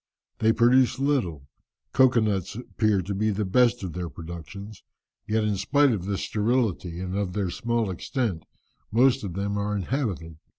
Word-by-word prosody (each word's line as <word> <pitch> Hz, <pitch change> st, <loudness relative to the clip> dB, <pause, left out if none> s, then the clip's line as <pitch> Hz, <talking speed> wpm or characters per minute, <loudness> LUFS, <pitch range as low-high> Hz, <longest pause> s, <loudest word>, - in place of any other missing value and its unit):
They 110 Hz, 0 st, +4 dB
produce 125 Hz, +2 st, +4 dB
little; 120 Hz, -, -1 dB, 0.5 s
cocoa 130 Hz, -3 st, +5 dB
nuts 100 Hz, -3 st, -1 dB
appear 110 Hz, -4 st, 0 dB
to 100 Hz, +3 st, -3 dB
be 110 Hz, +3 st, 0 dB
the 105 Hz, 0 st, -1 dB
best 120 Hz, +3 st, +3 dB
of 90 Hz, -4 st, -4 dB
their 90 Hz, -1 st, -4 dB
productions; 85 Hz, +7 st, -9 dB, 0.5 s
yet 110 Hz, +1 st, +1 dB
in 105 Hz, -2 st, 0 dB
spite 140 Hz, +8 st, +3 dB
of 95 Hz, -6 st, -2 dB
this 100 Hz, -1 st, -2 dB
sterility, 105 Hz, -6 st, 0 dB
and 95 Hz, 0 st, -4 dB
of 100 Hz, -3 st, -2 dB
their 95 Hz, -3 st, -1 dB
small 115 Hz, 0 st, -1 dB
extent, 95 Hz, -1 st, -2 dB, 0.5 s
most 125 Hz, +3 st, +4 dB
of 95 Hz, -4 st, -4 dB
them 100 Hz, +1 st, -1 dB
are 105 Hz, +1 st, -1 dB
inhabited. 95 Hz, -, -3 dB
105 Hz, 165 wpm, -26 LUFS, 95-120 Hz, 0.5 s, cocoa